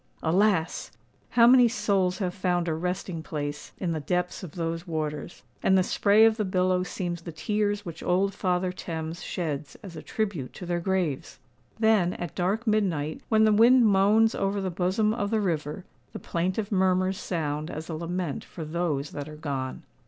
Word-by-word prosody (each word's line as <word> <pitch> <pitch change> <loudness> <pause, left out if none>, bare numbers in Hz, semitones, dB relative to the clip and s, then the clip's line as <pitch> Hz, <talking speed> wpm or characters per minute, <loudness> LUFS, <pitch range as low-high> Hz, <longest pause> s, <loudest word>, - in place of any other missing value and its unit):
Alas! 180 0 +1 0.4
how 235 -1 +5
many 250 0 +7
souls 195 -6 +1
have 185 -3 -2
found 180 -2 0
a 160 - +1
resting 180 0 -3
place 145 -2 -5
in 180 -3 -2
the 160 - -1
depths 180 +4 -2
of 180 -6 -8
those 165 0 -3
waters; 155 -1 -4 0.2
and 190 - +4
the 185 - +4
spray 205 +3 +4
of 225 0 +3
the 215 - 0
billow 185 -1 +1
seems 175 -2 -4
the 170 - -7
tears 205 +5 -1
which 165 -2 -7
old 195 +2 +1
Father 185 -1 0
Thames 165 -2 -5
sheds 150 -4 -4
as 185 -4 -9
a - - -7
tribute 195 - -3
to 180 - -8
their 175 0 -1
graves! 170 -5 -2 0.4
Then, 220 -5 +3
at 175 -3 -6
dark 195 +6 -1
midnight, 180 -9 0
when 220 -1 +4
the 215 -1 +5
wind 235 +3 +6
moans 210 +2 +4
over 195 +1 -1
the 190 -1 -2
bosom 190 +5 +1
of 205 -3 -2
the 220 0 +1
river, 165 -3 -2 0.3
the - - -5
plaintive 185 +5 -2
murmurs 185 0 +2
sound 155 -3 -3
as 160 -1 -6
a 165 - -5
lament 170 -1 -3
for 160 - -8
those 155 -3 -2
that 145 +1 -6
are 155 - -9
gone! 140 -4 -4
180 Hz, 180 wpm, -27 LUFS, 160-200 Hz, 0.4 s, many